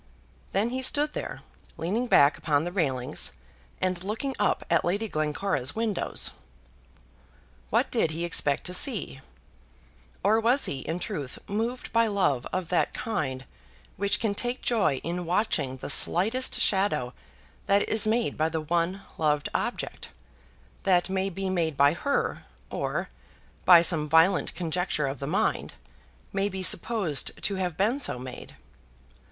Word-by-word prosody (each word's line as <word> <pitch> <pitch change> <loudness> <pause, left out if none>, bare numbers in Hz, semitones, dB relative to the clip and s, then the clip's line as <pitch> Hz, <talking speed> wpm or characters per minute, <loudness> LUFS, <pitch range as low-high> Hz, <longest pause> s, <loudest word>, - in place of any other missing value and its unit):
Then 215 +5 +1
he 260 +1 -2
stood 295 +3 +2
there, - - -5 0.4
leaning 200 +10 -1
back 145 -8 +5
upon 145 -2 +1
the 175 - -3
railings, 135 -9 0 0.5
and 185 -1 -1
looking 225 +7 -3
up - - +1
at - - +2
Lady 200 +6 0
Glencora's 150 -3 -1
windows. 220 -3 0 1.4
What - - +1
did - - +2
he 165 +2 -3
expect 145 -4 +1
to 180 - -5
see? 190 - -1 1.0
Or 220 +2 +4
was 240 +5 +2
he, 135 - -3
in 160 +5 -3
truth, 165 - -5
moved 230 +5 -3
by 230 0 +4
love 165 - +1
of 185 -3 -3
that 180 - +1
kind 135 -12 -3 0.5
which 200 +1 0
can 220 -3 0
take 245 +4 -3
joy 215 - +2
in 175 +2 -3
watching 160 -8 0
the - - -7
slightest 225 +9 +3
shadow 190 -11 +1 0.5
that 200 +1 +3
is 215 -1 +4
made 230 +2 +1
by 155 +1 +1
the 160 -1 -2
one 170 +4 -1 0.2
loved 150 -2 +1
object, - - -3 0.7
that 180 -1 +2
may 190 0 0
be 195 +1 -4
made 165 -5 -1
by 140 +1 +5
her, 280 +11 -1 0.3
or, - - -2 0.6
by 175 -2 +8
some 155 -3 +1
violent 165 +4 +4
conjecture 170 -2 -1
of 135 -1 -4
the 140 - -4
mind, 175 - 0 0.6
may 195 +1 +1
be 190 -1 -5
supposed 180 - 0
to 200 - +1
have 180 -3 -2
been 220 +8 +1
so 250 - -1
made? 125 0 -9
180 Hz, 145 wpm, -27 LUFS, 155-210 Hz, 1.4 s, by